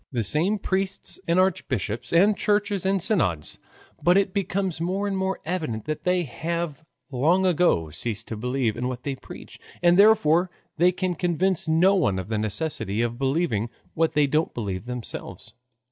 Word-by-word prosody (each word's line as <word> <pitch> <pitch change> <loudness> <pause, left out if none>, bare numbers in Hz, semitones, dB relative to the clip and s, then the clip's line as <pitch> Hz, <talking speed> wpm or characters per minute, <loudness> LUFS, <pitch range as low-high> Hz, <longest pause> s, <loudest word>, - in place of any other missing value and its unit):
The 120 -4 -1
same 165 - +2
priests 195 0 -2
and 170 +2 +3
archbishops 130 - -1
and 195 +5 +5
churches 205 -2 0
and 195 0 +2
synods, 160 - 0 0.4
but 175 +2 +4
it 195 -1 +1
becomes 190 -3 -1
more 190 +4 -1
and 200 - -2
more 190 0 -1
evident 155 - -3
that 155 0 -4
they 180 0 +2
have 160 +3 -4 0.3
long 165 +9 +2
ago 170 - +2
ceased 115 +5 -4
to 110 - -3
believe 125 0 -1
in 125 +1 -2
what 125 -1 -5
they 140 -2 -3
preach, - - -12 0.2
and 175 +1 +4
therefore 185 -5 +5 0.3
they 175 +2 +5
can 185 0 -2
convince 175 0 0
no 170 +5 +4
one 150 - +1
of 95 +1 -5
the 110 -2 -1
necessity 110 -1 -2
of 120 +1 -3
believing 135 -5 0 0.2
what 165 0 +1
they 150 -1 +4
don't 155 +4 0
believe 100 -2 -4
themselves. 125 -2 -6
165 Hz, 170 wpm, -25 LUFS, 120-185 Hz, 0.4 s, and